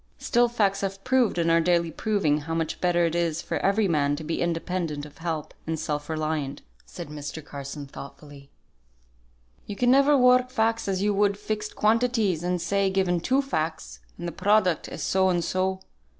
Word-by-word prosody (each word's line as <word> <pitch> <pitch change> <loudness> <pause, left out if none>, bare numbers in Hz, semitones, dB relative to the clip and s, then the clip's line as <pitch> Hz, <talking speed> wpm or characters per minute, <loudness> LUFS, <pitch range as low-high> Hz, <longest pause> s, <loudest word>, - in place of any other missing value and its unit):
"Still, 240 -1 +2
facts 200 -4 0
have 195 0 -4
proved 255 -6 +2
and 165 -1 +2
are 165 0 +4
daily 170 -1 +2
proving 160 -7 0
how 165 +2 -4
much 165 -1 -2
better 175 -1 +3
it 165 - -1
is 170 -2 0
for - - -2
every 200 +2 +2
man 145 -4 +1
to 155 - -7
be 160 +2 -3
independent 165 -3 -2
of 150 - -15
help, 165 -3 -4
and 160 -1 -2
self 150 -1 -3
reliant," 155 -3 -2 0.2
said 170 -4 -8
Mr. 150 +1 -7
Carson, 140 0 -7
thoughtfully. 140 0 -12 1.2
"You 205 - -5
can 245 +4 +3
never 280 +2 +5
work 250 0 +5
facts 230 -3 0
as 190 0 -1
you 205 0 +2
would 200 0 +2
fixed 210 0 -4
quantities, 220 -5 +2
and 180 0 -1
say, 195 +3 +1
given 190 -2 +1
two 265 +10 +1
facts, 155 - -3 0.2
and 175 - -5
the - - -3
product 190 -1 +2
is - - -6
so 190 0 +2
and 175 -2 +1
so. 190 +2 -1
175 Hz, 185 wpm, -26 LUFS, 155-205 Hz, 1.2 s, never